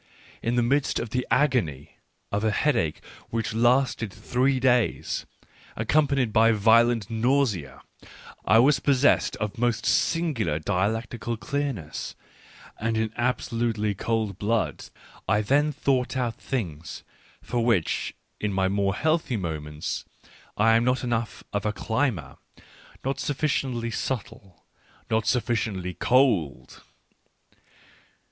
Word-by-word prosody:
In 115 +1 0
the 120 - +3
midst 140 +4 +1
of 115 -2 -5
the 125 0 -1
agony 125 - 0 0.3
of 100 +1 -1
a 110 - +3
headache 110 - 0 0.3
which 115 -2 -2
lasted 120 -1 +2
three 125 +5 0
days, 125 -2 +1 0.5
accompanied 135 0 +1
by 115 0 +5
violent 115 0 +3
nausea, 110 - 0 0.6
I - - +4
was 135 +4 +5
possessed 140 0 +3
of 110 0 -4
most 120 -2 0
singular 140 - +1
dialectical 110 +7 -2
clearness, 135 - -4 0.6
and 115 0 -1
in 110 0 -1
absolutely 115 -3 -1
cold 110 -1 -2
blood 105 -8 -1 0.4
I 105 +2 +3
then 145 +7 +2
thought 135 -3 0
out 120 -3 0
things, 85 - -4 0.4
for 120 -1 -1
which, 115 -9 0 0.2
in 105 - -1
my 95 -1 +1
more 100 0 0
healthy 155 - 0
moments, 75 -4 -4 0.5
I 115 +2 +5
am 115 - +3
not 125 +1 +1
enough 115 -2 -2
of 100 - -1
a 105 - 0
climber, 110 0 -2 0.7
not 135 +1 -1
sufficiently 135 -5 -1
subtle, 105 -7 -5 0.5
not 110 -1 +1
sufficiently 110 -7 0
cold. 120 - +1
115 Hz, 115 wpm, -26 LUFS, 105-130 Hz, 0.7 s, by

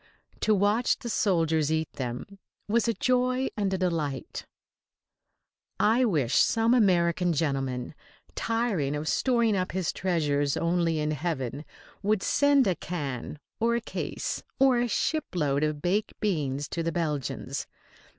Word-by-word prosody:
To 215 - +3
watch 205 +5 +2
the 240 - -6
soldiers 160 -7 +1
eat 160 0 -1
them 130 +10 -6 0.3
was 230 +3 +2
a 230 - +1
joy 255 +1 +1
and 200 -2 0
a 190 - 0
delight. 165 -7 -2 1.3
I 230 +4 +4
wish 145 - +1
some 225 +1 +4
American 180 -6 +3
gentleman, 135 -5 -1 0.4
tiring 220 - -1
of 150 +1 -4
storing 235 -2 +2
up 185 -2 -2
his 185 -3 -1
treasures 145 -6 0
only 170 -1 +1
in 150 0 0
heaven, 150 -3 -3 0.4
would 205 0 +1
send 285 -2 +4
a 190 - +2
can 150 -6 -5 0.2
or 235 +1 +2
a - - +1
case 225 - -4 0.2
or 265 -2 +4
a 240 - +1
shipload 170 - 0
of 150 -1 -1
baked 205 +5 -1
beans 145 -8 -1
to 170 - -3
the 165 0 -1
Belgians. 150 -6 -3
175 Hz, 140 wpm, -27 LUFS, 150-220 Hz, 1.3 s, I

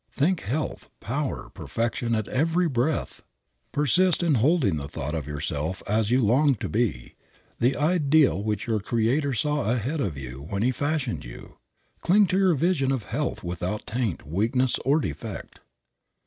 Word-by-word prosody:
Think 165 +5 +1
health, 140 +10 -3
power, 135 +6 -3
perfection 115 0 -2
at 110 -2 -2
every 165 +6 +1
breath. 140 +2 -1 0.5
Persist 175 +6 +3
in 165 -3 +3
holding 130 - +3
the 70 -1 -5
thought 75 +1 -5
of 75 -4 -3
yourself 75 +3 -3
as 105 0 +1
you 125 -1 +3
long 135 +6 +4
to - - -4
be, 100 - -1 0.5
the 125 +3 +3
ideal 150 - +3
which 105 0 -2
your 110 -2 0
Creator 120 +6 0
saw 150 +2 0
ahead 125 +6 -1
of 85 - -2
you 65 0 -7
when 100 +1 -1
he 125 - +3
fashioned 145 -2 -2
you. - - -11 0.4
Cling 200 +4 +4
to 185 - +2
your 185 -4 +4
vision 145 -3 +1
of 130 -5 -1
health - - -2
without 90 +4 -3
taint, 115 -5 -2
weakness 115 - +1
or 140 +5 +3
defect. 75 - -6
125 Hz, 160 wpm, -26 LUFS, 100-150 Hz, 0.5 s, long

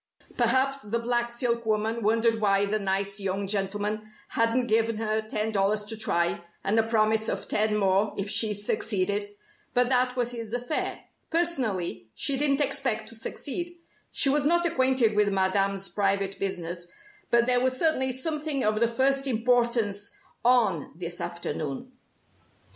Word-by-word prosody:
Perhaps 260 +3 +2
the 210 +2 -2
black 240 0 0
silk 235 -1 -1
woman 220 +1 0
wondered 225 +1 +2
why 200 -1 +3
the 215 +2 -1
nice 195 +1 -1
young 195 0 -2
gentleman 205 +2 -2 0.2
hadn't 230 +2 +1
given 225 -1 +1
her 220 0 0
ten 215 0 -2
dollars 210 +1 +1
to 210 +2 -2
try, 175 -6 0 0.2
and 210 +3 +2
a - - +6
promise 220 0 +2
of - - -3
ten 210 0 +2
more 195 +1 +1
if 195 - -2
she 210 +1 +2
succeeded. 205 0 -1 0.4
But 245 0 +3
that 250 -1 +2
was 245 -1 -1
his 230 -1 -5
affair. 245 +5 -2 0.3
Personally, 220 - -1
she 280 - +2
didn't 280 +1 +2
expect 255 -6 0
to 230 - -8
succeed. 345 +9 -4 0.3
She - - +3
was 285 +1 +3
not 345 +4 +3
acquainted 260 -8 +2
with 210 0 +3
Madame's 195 0 +1
private 195 -1 -1
business, 175 -2 -3 0.4
but 235 0 +4
there 250 0 +2
was 255 0 +1
certainly 265 -4 +2
something 295 +1 -1
of 215 0 +2
the 235 - +3
first 270 +4 +1
importance 235 -4 +1 0.3
"on" 225 - +2
this 175 0 -5
afternoon. 170 - -5
220 Hz, 155 wpm, -27 LUFS, 200-250 Hz, 0.4 s, a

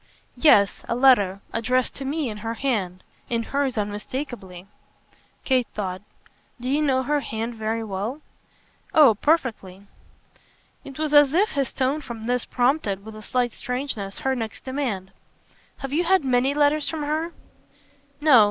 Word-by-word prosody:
"Yes, 210 -8 +4
a 235 - +1
letter. 205 -7 +4
Addressed 250 +2 0
to 275 - -5
me 290 +1 -1
in 215 -2 -5
her 225 +2 -4
hand 200 -9 -2 0.3
in 230 -1 0
hers 275 -1 -1
unmistakeably." 205 -2 -5 0.8
Kate 255 -3 +2
thought. 185 -3 -3 0.6
"Do 245 - -6
you 290 +3 +2
know 265 -3 +2
her 295 +3 +1
hand 225 -3 -4
very 225 0 -2
well?" 215 +8 -4 0.7
"Oh 290 -7 +8
perfectly." 215 - -1 1.0
It 270 -1 -10
was 305 -1 -1
as 290 0 +6
if 410 +4 +4
his 275 -3 -1
tone 270 +3 0
for 240 -5 -7
this 235 +2 -2
prompted 245 -6 0
with 220 0 -9
a 215 - -9
slight 245 +2 -1
strangeness 250 -6 -4
her 265 0 0
next 225 -3 -5
demand. 250 -9 -3 0.7
"Have 270 0 -6
you 335 +4 +2
had 375 -3 +3
many 260 +2 +2
letters 295 0 +3
from 315 -2 -3
her?" 310 +3 -1 0.9
"No. 295 -5 +7
250 Hz, 150 wpm, -24 LUFS, 220-285 Hz, 1.0 s, Oh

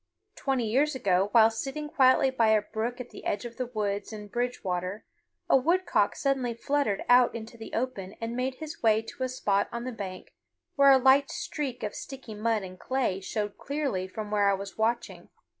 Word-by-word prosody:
Twenty 265 -4 0
years 275 +6 +2
ago, 195 -5 +2
while 225 -1 +6
sitting 270 +6 -4
quietly 265 -1 +4
by 235 -4 +2
a 215 -1 +4
brook 230 +4 -3
at 250 - -7
the - - -11
edge 205 - -2
of 235 -1 -8
the 255 - -2
woods 210 -4 -2
in 210 -1 -8
Bridgewater, 200 -5 -3 0.4
a - - +5
woodcock 340 +8 +2
suddenly 265 -4 0
fluttered 275 -4 0
out 245 -1 +5
into 230 0 -7
the 225 -1 -9
open 220 -6 -3
and 230 +1 -4
made 255 +1 -1
his 315 +2 -8
way 220 -1 +3
to 225 - -11
a 255 - 0
spot 205 -6 0
on 235 0 -4
the 255 - -4
bank 190 -5 -7 0.4
where 280 -1 +6
a 270 - +8
light 265 +2 +5
streak 265 -5 -4
of 210 - -3
sticky 265 -5 -8
mud 215 0 0
and 185 -1 -9
clay 255 -8 -1
showed 205 +1 -4
clearly 275 -11 -2
from 210 +2 -6
where 205 -1 +3
I 200 - +3
was 195 0 -7
watching. 230 +2 -2
235 Hz, 195 wpm, -28 LUFS, 210-260 Hz, 0.4 s, a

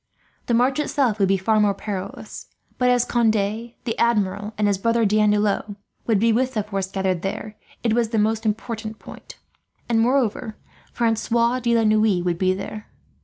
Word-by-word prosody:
The 235 - +2
march 255 +4 +2
itself 260 -7 0
would 195 - +3
be 195 0 +2
more 210 -2 +3
perilous; 195 -2 -6 0.3
but 250 0 +3
as 245 -1 +3
Conde, 235 -2 +2
the 225 +3 -3
Admiral, 210 -2 +1
and 210 - +1
his 200 -2 +1
brother 230 +2 +2
D'Andelot 210 0 +1 0.3
would 225 -3 +3
be 225 +3 +3
with 260 +2 0
the 215 - 0
force 195 -2 -3
gathered 190 -3 -1
there, 210 +3 -5 0.3
it 230 -2 +2
was 235 -1 +1
the 225 - -1
most 220 +1 +1
important 220 0 -3
point; - - -12 0.5
and 230 -1 +2
moreover 230 -3 0 0.3
Francois 235 +1 +1
de 235 -1 +1
la 225 - +2
Noue 215 -4 +3
would 175 -1 -1
be 185 -1 +2
there. 210 +2 -7
220 Hz, 170 wpm, -22 LUFS, 205-235 Hz, 0.5 s, would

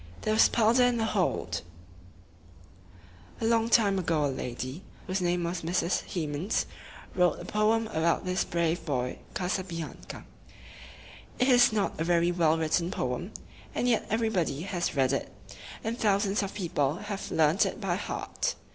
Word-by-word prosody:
There 215 - +1
was 220 - +6
powder 235 +2 +3
in 245 -1 +3
the 225 - +1
hold! 200 -5 -1 1.8
A 225 - -2
long 230 0 +2
time 205 -4 +4
ago 160 -4 +1
a 140 - -1
lady, 130 +5 -5 0.2
whose 185 0 -2
name 175 0 +1
was 170 +1 -2
Mrs. 170 +1 0
Hemans, 160 +3 -1 0.5
wrote 180 -1 +2
a - - -8
poem 220 +2 +2
about 165 0 +1
this 180 0 +1
brave 170 0 -1
boy 125 -6 -2 0.2
Ca 180 - -1
sa 185 - 0
bi 180 -2 -8
an 165 -2 -6
ca. - - -8 1.1
It 255 - +2
is 245 -2 +6
not 210 -6 -1
a - - +1
very 170 0 +2
well 165 -2 +3
written 165 +2 +1
poem, 130 +7 -3 0.4
and 245 - 0
yet 235 -2 +1
everybody 215 -10 0
has 180 -5 -2
read 135 -1 +2
it, 140 - -2 0.5
and 230 +2 -3
thousands 200 -1 +2
of 200 -1 -4
people 150 -7 0
have 205 +1 -5
learned 160 +3 +3
it - - -5
by - - -1
heart. - - -3
180 Hz, 165 wpm, -28 LUFS, 160-215 Hz, 1.8 s, was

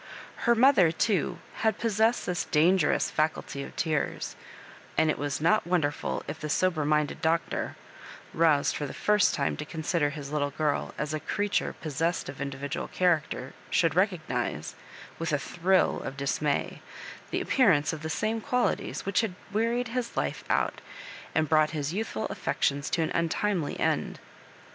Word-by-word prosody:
Her 235 - +6
mother, 230 - +6
too, 185 0 0 0.2
had 220 -2 +1
possessed 225 +1 +2
this 180 -1 -1
dan 170 +5 +4
gerous 150 - +1
faculty 155 -2 -1
of - - -8
tears; 155 -3 -1 0.6
and 155 - +4
it - - -3
was 145 -1 -2
not 175 +6 +3
wonder 165 -5 +2
ful - - -4
if 155 +2 -5
the 155 - -4
sober 170 -1 +1
minded 150 -1 +1
Doctor, 165 +1 0 0.6
roused 160 -3 +3
for 145 - -3
the - - -8
first 210 -2 +3
time 140 - 0
to - - -4
consider 160 -1 -1
his 145 -1 -7
little 145 -1 0
girl 150 +1 -1
as 150 0 -2
a 155 - -1
creature 205 +5 -1
pos 155 -3 -4
sessed 165 -2 0
of 135 0 -8
individual 140 +2 -4
character, 160 -7 0 0.2
should 165 -3 +2
recognise, 160 - -1 0.5
with 165 0 -2
a 145 - +3
thrill 180 +5 +1
of 135 - -6
dismay, 140 +1 -1 0.5
the - - -1
appearance 180 - +3
of 155 - -6
the 160 - -4
same 220 +7 -1
qualities 250 +3 -1
which 195 +2 +2
had 215 -6 -3 0.2
wearied 230 +2 +1
his 245 0 -3
life - - -1
out, - - +1 0.5
and 160 -1 +2
brought 155 +1 +3
his 145 +2 -2
youthful 200 - -2
affections 140 0 -1
to 165 - +1
an 160 - -2
untimely 170 0 0
end. - - 0
160 Hz, 165 wpm, -28 LUFS, 145-190 Hz, 0.6 s, Her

